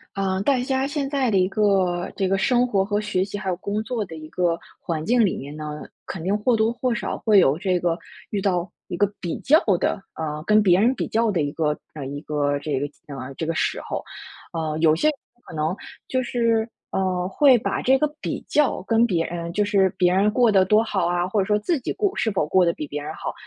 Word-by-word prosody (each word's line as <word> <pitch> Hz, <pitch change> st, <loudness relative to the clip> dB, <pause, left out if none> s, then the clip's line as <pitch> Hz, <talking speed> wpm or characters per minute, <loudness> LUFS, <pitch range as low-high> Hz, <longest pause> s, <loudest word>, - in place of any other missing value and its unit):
呃， 190 Hz, -1 st, 0 dB
大 265 Hz, +2 st, +2 dB
家 265 Hz, +1 st, 0 dB
现 285 Hz, -1 st, -2 dB
在 270 Hz, -4 st, +1 dB
的 200 Hz, -, +3 dB
一 185 Hz, 0 st, +3 dB
个 190 Hz, -4 st, +1 dB
这 195 Hz, -2 st, +1 dB
个 195 Hz, -, +1 dB
生 245 Hz, +5 st, +2 dB
活 200 Hz, -5 st, +2 dB
和 205 Hz, +1 st, -1 dB
学 210 Hz, -3 st, 0 dB
习 205 Hz, +1 st, -5 dB
还 200 Hz, -2 st, -4 dB
有 180 Hz, -, 0 dB
工 205 Hz, +3 st, -2 dB
作 235 Hz, -1 st, -2 dB
的 175 Hz, -5 st, -9 dB
一 155 Hz, 0 st, -9 dB
个 170 Hz, 0 st, 0 dB, 0.2 s
环 160 Hz, -2 st, -3 dB
境 240 Hz, +1 st, +4 dB
里 190 Hz, -, -1 dB
面 140 Hz, +2 st, -8 dB
呢， 150 Hz, 0 st, -6 dB, 0.2 s
肯 185 Hz, -, -6 dB
定 190 Hz, +5 st, 0 dB
或 245 Hz, +4 st, +2 dB
多 220 Hz, +1 st, +2 dB
或 250 Hz, 0 st, -1 dB
少 -, -, -3 dB
会 215 Hz, -3 st, +5 dB
有 145 Hz, -5 st, +4 dB
这 180 Hz, 0 st, 0 dB
个， 170 Hz, -1 st, 0 dB, 0.3 s
遇 205 Hz, -, -2 dB
到 180 Hz, -2 st, 0 dB, 0.2 s
一 175 Hz, -, -4 dB
个 205 Hz, -, +3 dB
比 170 Hz, -, -3 dB
较 300 Hz, +3 st, +5 dB, 0.2 s
的 195 Hz, -, -1 dB
呃， 155 Hz, -1 st, -4 dB
跟 215 Hz, +2 st, +5 dB
别 180 Hz, -3 st, +5 dB
人 235 Hz, +6 st, +3 dB
比 -, -, -3 dB
较 225 Hz, 0 st, +1 dB
的 175 Hz, -5 st, 0 dB
一 145 Hz, -, 0 dB
个 150 Hz, -2 st, 0 dB, 0.2 s
嗯， 140 Hz, -2 st, -6 dB
一 145 Hz, -, -4 dB
个 145 Hz, -2 st, -1 dB
这 145 Hz, -1 st, -2 dB
个 145 Hz, -, -1 dB, 0.2 s
嗯， 135 Hz, -2 st, -7 dB
这 160 Hz, -, -2 dB
个 165 Hz, -, -1 dB
时 -, -, 0 dB
候。 -, -, -5 dB, 0.5 s
呃， 155 Hz, -2 st, -2 dB
有 155 Hz, -1 st, +5 dB
些 165 Hz, -, +1 dB
人 310 Hz, -, +3 dB, 0.3 s
可 -, -, -9 dB
能 155 Hz, +2 st, 0 dB, 0.4 s
就 255 Hz, -, +1 dB
是， 230 Hz, -2 st, +1 dB, 0.2 s
呃， 185 Hz, -2 st, 0 dB
会 260 Hz, +5 st, +5 dB
把 235 Hz, -, -2 dB
这 265 Hz, +1 st, +4 dB
个 300 Hz, -, +2 dB
比 -, -, -4 dB
较 295 Hz, -9 st, +2 dB
跟 225 Hz, +4 st, +2 dB
别 170 Hz, -6 st, 0 dB
人 170 Hz, 0 st, -5 dB
就 210 Hz, -, +2 dB
是 200 Hz, -2 st, +3 dB
别 180 Hz, -1 st, +3 dB
人 195 Hz, +3 st, +3 dB
过 240 Hz, +1 st, +3 dB
得 190 Hz, -2 st, +4 dB
多 215 Hz, +3 st, +4 dB
好 205 Hz, -4 st, -1 dB
啊， 175 Hz, 0 st, 0 dB
或 190 Hz, +3 st, -1 dB
者 190 Hz, -, +2 dB
说 210 Hz, +1 st, +2 dB
自 295 Hz, +9 st, 0 dB
己 245 Hz, -, -3 dB
过 400 Hz, -2 st, 0 dB
是 225 Hz, -, +1 dB
否 195 Hz, -7 st, 0 dB
过 180 Hz, +4 st, +3 dB
得 170 Hz, -, +2 dB
比 150 Hz, -, -5 dB
别 145 Hz, +1 st, -5 dB
人 150 Hz, +2 st, -6 dB
好， -, -, -5 dB
190 Hz, 265 characters per minute, -23 LUFS, 165-225 Hz, 0.5 s, 会